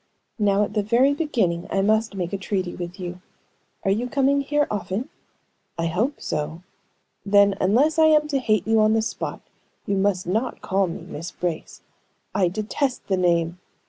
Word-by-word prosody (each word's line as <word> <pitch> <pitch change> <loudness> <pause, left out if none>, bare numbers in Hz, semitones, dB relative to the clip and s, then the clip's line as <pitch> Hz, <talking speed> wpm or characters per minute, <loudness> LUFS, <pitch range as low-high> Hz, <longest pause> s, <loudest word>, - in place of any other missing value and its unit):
"Now, 205 -1 +3
at 205 - -4
the 210 - +1
very 240 +7 +3
beginning, 225 - 0
I 195 - +1
must 220 +1 +1
make 180 -1 -3
a - - 0
treaty 190 -2 -2
with 175 +2 -7
you. 180 0 -6 0.6
Are 195 - +2
you 235 +5 0
coming 280 +1 +2
here 295 +1 +1
often?" 210 +6 -3 0.7
"I 165 - -1
hope 215 - -1
so." 160 +3 -4 0.6
"Then, 200 0 +5
unless 275 - +3
I 320 - +7
am 305 -1 +4
to 280 -2 +1
hate 215 -6 +1
you 225 +1 +3
on 215 0 +4
the 220 0 +2
spot, 225 - -4 0.4
you 200 - 0
must 190 -2 +1
not 220 +8 -1
call 195 0 +1
me 170 - -6
Miss 165 +4 -7
Brace. 175 -2 -5 0.5
I 190 -3 +3
detest 215 +9 -2
the 190 - +2
name! 170 -1 +1
205 Hz, 175 wpm, -23 LUFS, 180-240 Hz, 0.7 s, I